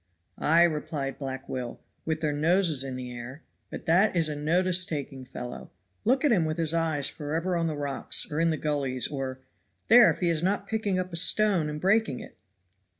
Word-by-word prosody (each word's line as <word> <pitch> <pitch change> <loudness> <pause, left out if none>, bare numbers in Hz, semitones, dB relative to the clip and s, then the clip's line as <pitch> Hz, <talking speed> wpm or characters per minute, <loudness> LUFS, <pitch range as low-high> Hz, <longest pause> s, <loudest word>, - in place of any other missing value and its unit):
"Ay," 165 +3 +5
replied 150 -4 -2
Black 135 -1 -5
Will, 125 -2 -5 0.3
"with 160 -1 -2
their 150 -2 0
noses 160 -1 +2
in 135 -2 -5
the 125 -1 -6
air. 125 +5 -9 0.3
But - - -8
that 185 +5 +3
is 165 -2 +1
a 150 - -3
notice 175 +5 +2
taking 140 -7 -5
fellow. 125 -1 -8 0.4
Look 265 +6 +2
at 290 - +4
him 190 -7 +3
with 155 0 -2
his 165 -1 +1
eyes 160 -4 +1
forever 165 +5 -3
on 165 -1 0
the 155 -2 -3
rocks, 140 -1 -1
or 150 - -2
in 165 0 +3
the 160 - 0
gullies, 140 -4 -1
or 130 -2 -5 0.5
there 235 0 +8
if - - -2
he 175 - +1
is 165 -2 0
not 195 +2 0
picking 215 -3 -1
up 185 -1 -3
a - - +1
stone 185 -3 +3
and 150 0 -5
breaking 195 - +2
it!" - - -11
160 Hz, 205 wpm, -27 LUFS, 140-180 Hz, 0.5 s, there